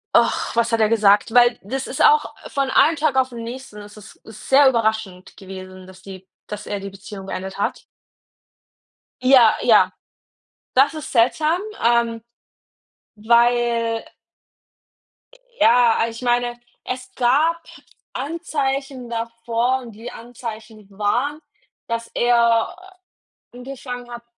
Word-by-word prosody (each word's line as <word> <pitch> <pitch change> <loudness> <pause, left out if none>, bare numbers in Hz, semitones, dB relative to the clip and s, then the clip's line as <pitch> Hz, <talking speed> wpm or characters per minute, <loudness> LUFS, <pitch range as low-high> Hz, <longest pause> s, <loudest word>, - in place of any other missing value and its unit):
ach, - - +2
was 235 0 +2
hat 230 - +1
er 215 -1 +3
gesagt? 210 0 +3
Weil 240 -1 +5
das 265 +6 -4
ist - - -1
auch 450 0 +3
von 275 -1 -2
einem 315 +4 +4
Tag 295 -3 0
auf 260 -1 +1
'n 235 - -7
nächsten, 235 -2 -8
es 205 +1 -12
ist 210 - -15
es 220 -1 -13
sehr 275 0 +6
überraschend 220 -6 -2
gewesen, 185 -1 -10
dass 185 0 -15
die 190 -1 -11 0.2
dass 210 0 -8
er 205 -1 -3
die 195 0 -8
Beziehung 195 0 -10
beendet 190 0 -6
hat. 200 - -2 1.4
Ja, 255 -3 +6
ja, - - +5 0.8
das 275 +4 +4
ist 310 - -7
seltsam, 305 +9 +2 0.2
ähm, 235 -1 +2 0.9
weil 235 0 +2 1.6
ja, 230 -1 +4
ich 230 +1 -8
meine, 240 0 0 0.2
es 255 0 -6
gab 295 +7 +2 0.5
Anzeichen 275 -4 -3
davor. 230 +2 -2
Die 230 +2 -9
Anzeichen 225 -3 -9
waren, 240 +9 -1 0.5
dass 230 0 -4
er 235 +4 +2 0.8
angefangen 245 -1 -8
hat, 240 0 -8
235 Hz, 125 wpm, -21 LUFS, 215-260 Hz, 1.6 s, sehr